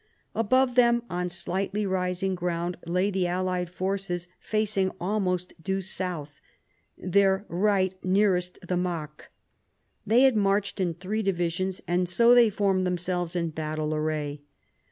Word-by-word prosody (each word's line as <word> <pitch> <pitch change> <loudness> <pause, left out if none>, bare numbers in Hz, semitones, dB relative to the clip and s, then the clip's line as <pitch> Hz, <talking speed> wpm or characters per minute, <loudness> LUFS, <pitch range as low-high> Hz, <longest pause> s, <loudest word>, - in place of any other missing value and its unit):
Above 250 +3 +2
them 235 -1 +4
on 180 0 -1
slightly 190 +4 -2
rising 185 0 -1
ground 175 0 -2
lay 180 +4 +1
the 185 -2 0
allied 180 0 -1
forces 185 -1 -3
facing 210 -3 0
almost 180 -1 -1
due 190 +3 -1
south, 180 -6 -4 0.6
their 195 +2 +2
right 190 +1 +2
nearest 185 -2 +2
the 180 - -1
Marcq. 170 -4 -3 0.8
They 225 +4 +4
had 265 -3 +5
marched 200 0 +1
in 175 -3 0
three 195 +5 -3
divisions, 185 0 -1
and 175 0 +1
so 235 +6 +5
they 240 -2 +7
formed 195 -2 +1
themselves 180 -1 -2
in 170 -2 -1
battle 155 0 -3
array. 150 -1 -2
185 Hz, 135 wpm, -27 LUFS, 175-200 Hz, 0.8 s, they